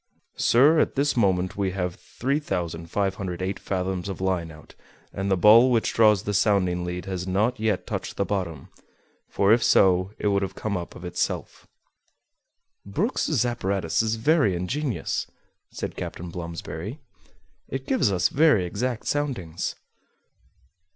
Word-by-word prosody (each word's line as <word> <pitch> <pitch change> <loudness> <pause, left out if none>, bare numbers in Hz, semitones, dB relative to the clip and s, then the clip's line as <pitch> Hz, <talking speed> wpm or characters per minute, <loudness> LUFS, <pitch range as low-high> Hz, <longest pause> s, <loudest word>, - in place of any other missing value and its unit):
"Sir, 145 +7 +5
at - - +1
this 140 +1 +1
moment 95 -5 +1
we 95 -2 -1
have 90 -2 -2
3,508 95 - -3
fathoms 95 -1 -3
of 95 - -5
line 95 -3 -1
out, 80 -1 -14 0.4
and 95 0 -2
the 95 - +2
ball 110 +7 +7
which 115 -3 +1
draws 105 -4 +4
the 105 - -2
sounding 90 -4 +2
lead 90 0 -4
has 95 -1 -4
not 105 +6 +1
yet 110 -3 0
touched - - -5
the 100 - +1
bottom; 90 -7 -3 0.6
for 100 +2 +3
if 115 0 +3
so, 95 0 +4
it 105 - 0
would 100 -1 +2
have 95 -1 -4
come 110 -2 -3
up 85 -1 -5
of 90 - -9
itself." 90 0 -3 1.2
"Brook's 145 - 0
apparatus 100 -8 0
is 110 0 0
very 125 - +2
ingenious," 125 - -2 0.4
said - - -6
Captain 85 0 -6
Blomsberry; 85 - -6 0.7
"it 135 0 -5
gives 130 -6 +2
us 90 -2 +2
very 145 - +4
exact 115 +6 -3
soundings." 120 - -2
95 Hz, 140 wpm, -25 LUFS, 90-115 Hz, 1.2 s, ball